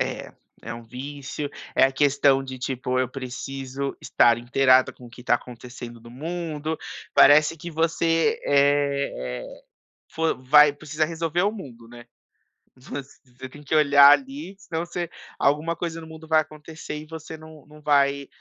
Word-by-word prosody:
É, -, -, -3 dB, 0.3 s
é -, -, -6 dB
um 115 Hz, -, -9 dB
vício, 140 Hz, +4 st, -6 dB, 0.3 s
é -, -, +5 dB
a 135 Hz, -, +2 dB
questão 140 Hz, -1 st, +3 dB
de, 130 Hz, -1 st, -8 dB
tipo, 130 Hz, 0 st, -2 dB
eu 130 Hz, -, +1 dB
preciso 135 Hz, +1 st, -5 dB
estar 120 Hz, -1 st, +3 dB
inteirada 130 Hz, +1 st, +3 dB
com 125 Hz, -, -14 dB
o -, -, -14 dB
que 125 Hz, -, -13 dB
está 120 Hz, -, +3 dB
acontecendo 120 Hz, -1 st, -8 dB
no 115 Hz, +1 st, -14 dB
mundo. 160 Hz, +2 st, -4 dB, 0.4 s
Parece 150 Hz, +3 st, +6 dB
que 170 Hz, +3 st, -8 dB
você, 165 Hz, +1 st, +1 dB
eh 140 Hz, -, +1 dB
eh, -, -, -12 dB, 0.5 s
fo 160 Hz, 0 st, 0 dB
vai 150 Hz, +2 st, +6 dB
precisa 155 Hz, +2 st, -2 dB
resolver 165 Hz, +2 st, -1 dB
o 205 Hz, -, +1 dB
mundo, 120 Hz, -, -11 dB
né? 120 Hz, 0 st, -13 dB, 0.7 s
Voc 135 Hz, +2 st, -6 dB
você 130 Hz, -1 st, -14 dB
tem 145 Hz, +3 st, -14 dB
que 150 Hz, -, -1 dB
olhar 145 Hz, -2 st, +7 dB
ali 270 Hz, -, -1 dB
senão 170 Hz, -4 st, -4 dB
você 175 Hz, -1 st, -4 dB, 0.3 s
alguma 150 Hz, +4 st, +1 dB
coisa 165 Hz, -1 st, -4 dB
no -, -, -10 dB
mundo 160 Hz, 0 st, -12 dB
vai 155 Hz, 0 st, +4 dB
acontecer 155 Hz, +1 st, -9 dB
e 155 Hz, +1 st, -9 dB
você 160 Hz, 0 st, -8 dB
não 155 Hz, -2 st, -14 dB
não 150 Hz, 0 st, -16 dB
vai 140 Hz, -1 st, +2 dB
145 Hz, 165 wpm, -24 LUFS, 130-160 Hz, 0.7 s, olhar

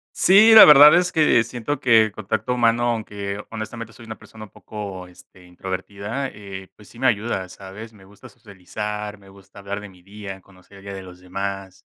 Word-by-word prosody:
Sí, 210 Hz, +4 st, +6 dB
la 220 Hz, -, +11 dB
verdad 150 Hz, 0 st, +8 dB
es 180 Hz, 0 st, 0 dB
que 150 Hz, -7 st, +3 dB
siento 125 Hz, +5 st, -5 dB
que 115 Hz, -5 st, +3 dB
contacto 110 Hz, +3 st, -4 dB
humano, 120 Hz, 0 st, +1 dB
aunque 105 Hz, -3 st, -5 dB
honestamente 115 Hz, +1 st, -8 dB
soy 115 Hz, -, -15 dB
una 110 Hz, -, -9 dB
persona 110 Hz, 0 st, -13 dB
un 105 Hz, -, -16 dB
poco, 100 Hz, -4 st, -9 dB
este, 90 Hz, +1 st, -19 dB
introvertida, 100 Hz, +8 st, -6 dB
eh, 100 Hz, -3 st, -11 dB
pues 105 Hz, -, -19 dB
sí 120 Hz, -, -17 dB
me 130 Hz, -, -1 dB
ayuda, 105 Hz, -5 st, -1 dB
¿sabes?, 100 Hz, +4 st, -12 dB
me 100 Hz, -3 st, -19 dB
gusta 100 Hz, +1 st, -16 dB
socializar, 105 Hz, -1 st, -8 dB
me 100 Hz, -1 st, -20 dB
gusta 100 Hz, +1 st, -17 dB
hablar 100 Hz, +1 st, -6 dB
de 105 Hz, -, -11 dB
mi 90 Hz, -2 st, -20 dB
día, 100 Hz, 0 st, -10 dB
conocer 95 Hz, +1 st, -20 dB
el -, -, -16 dB
día 100 Hz, -, -8 dB
de 95 Hz, -, -8 dB
los 90 Hz, 0 st, -14 dB
demás, 95 Hz, 0 st, -7 dB
105 Hz, 195 wpm, -21 LUFS, 95-115 Hz, -, la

